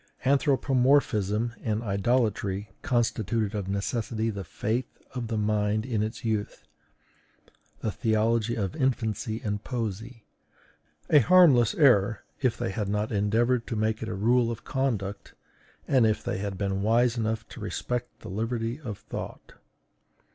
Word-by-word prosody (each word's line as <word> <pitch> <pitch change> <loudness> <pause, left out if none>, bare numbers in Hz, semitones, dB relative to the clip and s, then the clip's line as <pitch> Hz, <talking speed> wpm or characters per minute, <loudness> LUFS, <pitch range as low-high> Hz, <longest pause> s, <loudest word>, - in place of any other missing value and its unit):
Anthropomorphism 130 -6 +2
and 110 0 -1
idolatry 100 -2 0
constituted 115 - 0
of 100 -3 -3
necessity 110 +3 -1
the 100 -2 -5
faith 115 +7 -2 0.3
of 125 -2 -4
the 110 -1 -2
mind 105 0 +1
in 115 -5 -1
its 110 +3 -4
youth, 110 -2 -2 1.2
the 110 - -1
theology 115 +1 +1
of 100 -5 -2
infancy 110 -3 -1
and 105 -1 -2
poesy. 115 -1 -4 0.9
A 150 - +8
harmless 135 -6 +6
error, 110 -8 +4 0.2
if 125 -4 +1
they - - -2
had 100 0 -2
not 105 +1 -1
endeavored 115 +4 +1
to 120 - -3
make 110 +1 0
it 110 - -4
a - - -3
rule 115 +4 +3
of 115 -1 -5
conduct, 110 -7 -2 0.5
and 130 -5 +4
if 110 - 0
they - - -2
had 100 -1 -4
been 100 -1 -1
wise 115 +3 +3
enough 110 -1 -2
to - - -10
respect 125 -1 -4
the - - -8
liberty 115 - -2
of 105 -8 -5
thought. - - -8
110 Hz, 140 wpm, -27 LUFS, 105-120 Hz, 1.2 s, A